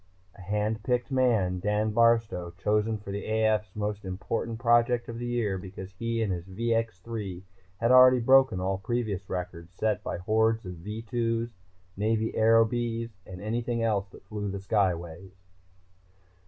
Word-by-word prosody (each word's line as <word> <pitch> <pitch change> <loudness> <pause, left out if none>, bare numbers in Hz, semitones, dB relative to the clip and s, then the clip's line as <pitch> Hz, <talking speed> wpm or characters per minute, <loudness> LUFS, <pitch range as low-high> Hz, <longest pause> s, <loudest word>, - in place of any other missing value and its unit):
A - - -14
hand 105 +3 -1
picked 125 +2 -1
man, 110 -9 +2
Dan 105 +3 0
Barstow, 115 -6 +2
chosen 105 +2 +1
for 100 -1 -8
the 100 +1 -4
AF's 110 -2 0
most 105 0 -3
important 110 +4 -3
project 120 0 +3
of 115 0 -6
the 120 - -4
year 110 -6 -1
because 95 0 -9
he 115 +3 -2
and 100 -3 0
his 90 0 -6
VX 115 0 -1
3 100 -6 -5 0.3
had 115 +2 +2
already 130 0 +8
broken 130 -4 +5
all 95 +1 -1
previous 105 -3 -2
records 90 -2 -5
set 105 -1 0
by - - -3
hordes 110 +4 +1
of 90 -1 -7
V 105 +6 -6
2s, 115 0 -1 0.4
Navy 110 +2 0
Aerobees 115 +1 +2 0.2
and 90 -1 -9
anything 115 +1 -1
else 100 -3 0
that 95 - -16
flew 105 +1 -4
the 100 - -4
skyways. 95 -2 -1
110 Hz, 155 wpm, -28 LUFS, 95-115 Hz, 0.4 s, already